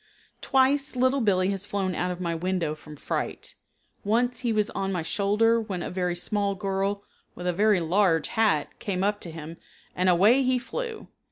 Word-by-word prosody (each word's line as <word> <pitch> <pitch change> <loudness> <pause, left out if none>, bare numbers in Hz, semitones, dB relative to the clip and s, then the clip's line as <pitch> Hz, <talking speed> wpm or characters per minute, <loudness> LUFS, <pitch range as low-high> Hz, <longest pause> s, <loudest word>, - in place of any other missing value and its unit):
Twice 275 +1 +2
Little 260 +2 +2
Billee 190 -3 +2
has 195 +1 -3
flown 195 -2 -1
out 180 +1 -1
of 180 0 -4
my 170 -2 -2
window 170 -2 -1
from 155 0 -12
fright. - - -4 0.5
Once 240 +4 +1
he 240 -2 -1
was 210 -1 +1
on 195 0 -2
my 175 -3 -2
shoulder 215 +6 +2
when 195 -5 -4
a - - -5
very 180 -1 -1
small 200 +3 -1
girl 195 +1 -2 0.3
with 180 - -7
a 180 - +1
very 205 +1 +3
large 170 -1 +2
hat 215 -10 +1
came 190 -2 -2
up 205 +1 0
to 175 - -7
him 165 0 -8 0.4
and 185 +1 +2
away 205 +9 +5
he 255 -1 +2
flew. 450 - -5
195 Hz, 185 wpm, -26 LUFS, 180-225 Hz, 0.5 s, away